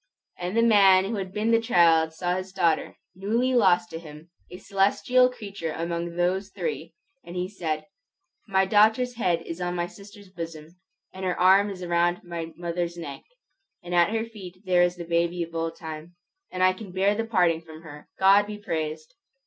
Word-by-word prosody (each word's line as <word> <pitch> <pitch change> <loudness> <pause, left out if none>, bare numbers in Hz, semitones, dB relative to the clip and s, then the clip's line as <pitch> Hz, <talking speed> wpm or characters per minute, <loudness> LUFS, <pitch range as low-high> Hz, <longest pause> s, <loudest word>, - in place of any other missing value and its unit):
And 180 +5 -3
the 230 - +4
man 195 -4 +6
who 215 +2 -3
had 190 -1 -4
been 215 +3 0
the 230 0 +4
child 165 -8 +4
saw 175 +2 -2
his 185 0 -5
daughter, 170 -4 0 0.2
newly 225 +7 0
lost 205 -3 +3
to 165 - -5
him, 155 +1 -13 0.2
a 180 - -9
celestial 205 +7 +2
creature 200 -9 -6
among 170 +1 -4
those 185 +3 0
three, 455 - -5 0.3
and 175 - -10
he 180 0 -2
said, 160 -6 -4 0.6
"My 190 -1 +2
daughter's 220 +5 +3
head 175 -7 0
is 165 +2 -7
on 175 0 -2
my 175 -1 -1
sister's 200 +2 -14
bosom, 165 -3 -7 0.4
and 190 - -8
her 180 -1 -1
arm 195 +3 +5
is 185 -2 -6
round 175 0 +1
my 170 -1 -6
mother's 175 0 -3
neck, 145 -5 -7 0.6
and 175 0 -6
at 175 +1 +4
her 225 +1 -1
feet 190 -4 -12
there 180 -1 +3
is 175 0 +2
the 175 -1 -7
baby 170 +1 0
of 165 0 -10
old 165 0 -3
time, 160 +1 -9 0.4
and 185 0 -1
I 185 0 +5
can 195 0 -10
bear 195 +2 +2
the 225 +2 -2
parting 175 -7 +2
from 160 -1 -13
her, 150 -2 -12
God 200 +2 +5
be 210 0 -6
praised!" 160 -5 -4
180 Hz, 190 wpm, -25 LUFS, 170-200 Hz, 0.6 s, man